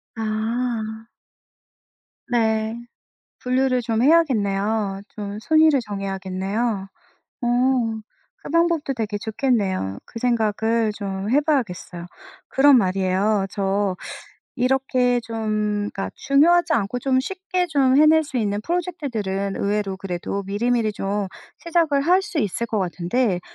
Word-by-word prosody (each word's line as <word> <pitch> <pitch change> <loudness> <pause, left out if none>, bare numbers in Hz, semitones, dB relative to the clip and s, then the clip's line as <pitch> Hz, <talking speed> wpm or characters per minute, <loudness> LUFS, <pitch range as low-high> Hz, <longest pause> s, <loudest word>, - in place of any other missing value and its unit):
아. 220 0 -2 1.3
네. 220 -1 +1 0.7
분류를 255 0 +1
좀 225 -1 0
해야겠네요. 215 -9 +2
좀 205 -1 -5
순위를 310 +1 +4
정해야겠네요. 195 +1 -3 0.6
어 - - +1 0.9
그 - - -10
방법도 335 -4 +2
되게 220 -3 -3
좋겠네요. 205 - -1
그 230 - -9
생각을 225 -2 +1
좀 195 0 -4
해 290 - +4
봐야겠어요. 205 - -2 0.4
그럼 275 0 +5
말이에요. 195 0 +1
저 195 -1 -1 0.6
이렇게 255 -1 +2
좀 215 -2 -2
그러니까 195 - -3
중요하지 330 +4 +3
않고 215 -1 0
좀 260 0 +2
쉽게 370 +4 -2
좀 270 -4 +3
해낼 310 +1 +6
수 275 -3 -5
있는 205 -2 -1
프로젝트들은 235 - -2
의외로 200 -1 -1
그래도 190 +1 -4
미리미리 220 +1 0
좀 200 0 -2 0.3
시작을 330 -4 +1
할 360 +6 +4
수 405 -6 -3
있을 210 0 -1
것 220 -2 -2
같은데 185 +3 0
225 Hz, 255 characters per minute, -22 LUFS, 200-270 Hz, 1.3 s, 해낼